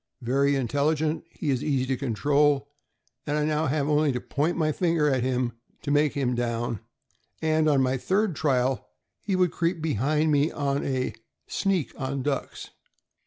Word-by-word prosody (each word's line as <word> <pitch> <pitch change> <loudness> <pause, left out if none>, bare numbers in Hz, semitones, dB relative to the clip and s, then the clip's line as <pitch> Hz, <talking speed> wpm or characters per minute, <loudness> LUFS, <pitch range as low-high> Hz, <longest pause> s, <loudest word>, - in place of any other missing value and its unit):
Very 140 +4 +2
intelli 140 +4 +1
gent, 155 +2 -2
he 155 -3 -3
is 130 - -1
easy 135 -4 +1
to 130 0 0
control, 140 +3 +1 0.6
and 150 0 0
I 150 - +1
now 155 +1 +1
have 140 +1 0
only 150 -1 +3
to 125 - -1
point 150 +7 -1
my 155 -2 +2
finger 165 -2 +1
at 135 -3 +2
him 125 -1 0 0.3
to 145 - -2
make 145 0 +3
him 130 -3 0
down; 120 -2 -2 0.6
and 155 -1 +2
on 140 -3 +3
my 130 +1 +1
third 190 - 0
trial 130 -3 0 0.3
he 195 - -1
would 180 -2 +2
creep 170 0 -1
behind 155 +1 +1
me 145 +1 +3
on 140 -1 -1
a 130 -2 -1 0.2
' - - -55
sneak' 190 -7 0
on 135 0 -2
ducks." 140 -1 -3
145 Hz, 175 wpm, -26 LUFS, 130-155 Hz, 0.6 s, only